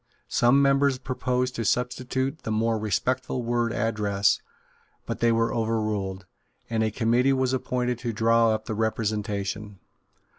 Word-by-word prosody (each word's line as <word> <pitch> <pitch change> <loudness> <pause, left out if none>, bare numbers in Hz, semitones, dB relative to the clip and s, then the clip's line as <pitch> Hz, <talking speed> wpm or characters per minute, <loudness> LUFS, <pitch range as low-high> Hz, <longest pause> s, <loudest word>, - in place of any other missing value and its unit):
Some 130 +4 +4
members 140 -1 +3
proposed 125 -1 -1
to 115 - -1
substitute 125 +5 -1
the - - -5
more 110 +1 +1
respectful 125 +4 -1
word 120 0 0
Address: 105 -3 +1 0.6
but - - -4
they 115 0 +3
were 115 0 +1
overruled; 105 -4 -1 0.5
and 110 -1 +1
a 110 - +2
committee 120 +5 +2
was 130 -1 +1
appointed 125 -2 -1
to 120 -1 -2
draw 115 +1 +3
up 110 0 -1
the 110 - -3
Representation. 105 -2 -2
115 Hz, 140 wpm, -26 LUFS, 110-125 Hz, 0.6 s, Some